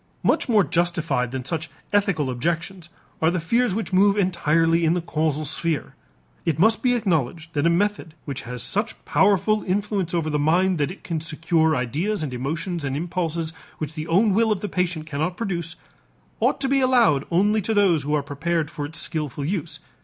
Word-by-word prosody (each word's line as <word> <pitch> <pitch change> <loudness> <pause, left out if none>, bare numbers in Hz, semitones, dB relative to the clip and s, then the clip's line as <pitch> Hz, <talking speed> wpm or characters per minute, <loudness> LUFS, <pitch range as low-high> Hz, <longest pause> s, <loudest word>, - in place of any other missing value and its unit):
Much - - +2
more 215 -4 +5
justified 165 -6 0
than 130 0 -5
such 160 +1 -3 0.2
ethical 195 -10 +1
objections 170 +6 -3 0.3
are 160 - +4
the 180 +1 0
fears 230 +5 +1
which 215 -3 -3
move 200 +2 +4
entirely 165 -3 +2
in 165 +1 +3
the - - +1
causal 155 -2 -1
sphere. 160 +1 -2 0.5
It 165 -3 0
must 220 +6 +3
be 250 -1 +3
acknowledged 165 - -1
that 145 +2 +2
a - - +5
method 175 -2 0
which 140 -3 -5
has 125 0 -6
such 205 - -2
powerful 205 +2 +3
influence 200 -2 -1
over 165 -2 0
the 150 - 0
mind 175 +4 +2
that 145 - +1
it 185 - -10
can 165 -3 -3
secure 160 0 +1
ideas 155 - -1
and 140 -4 -4
emotions 160 +6 -3
and 135 0 -2
impulses 165 -1 -2 0.2
which 155 0 -5
the 155 0 -5
own 195 +5 +3
will 220 +2 +3
of 205 - 0
the 210 - -2
patient 175 -3 -1
cannot 155 +4 -2
produce, 175 -6 -3 0.6
ought - - +2
to 270 - +1
be 275 0 +2
allowed 240 - +4
only 205 +5 +2
to 220 +3 -1
those 190 -7 +4
who 150 +2 0
are 145 - 0
prepared 155 +2 -2
for 145 -1 -4
its 160 +2 -8
skillful 150 -3 -2
use. 175 0 -3
170 Hz, 190 wpm, -23 LUFS, 155-195 Hz, 0.6 s, more